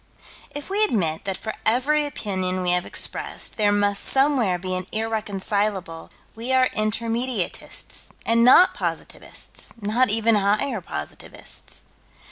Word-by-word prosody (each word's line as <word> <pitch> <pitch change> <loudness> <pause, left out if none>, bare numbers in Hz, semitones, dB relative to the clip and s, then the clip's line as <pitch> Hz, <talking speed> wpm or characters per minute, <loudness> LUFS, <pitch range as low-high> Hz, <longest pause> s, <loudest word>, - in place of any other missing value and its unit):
If 290 0 -7
we 415 +2 +3
admit 170 - 0
that 195 -1 -1
for 220 - -5
every 290 +6 +2
opinion 185 -8 -3
we 180 - +2
have 180 0 +1
expressed, - - -1
there 210 -2 +3
must 205 0 +2
somewhere 265 -9 +3
be 185 +1 -4
an 185 0 -3
irreconcilable, 205 -5 -1 0.3
we 230 +3 -4
are 255 -1 +4
Intermediatists 225 0 -2 0.2
and 230 0 +3
not 260 +9 +7
positivists; - - -5
not 230 +5 +1
even 225 +2 +3
higher 210 +3 +1
positivists. 75 - -8
215 Hz, 125 wpm, -23 LUFS, 190-245 Hz, 0.3 s, not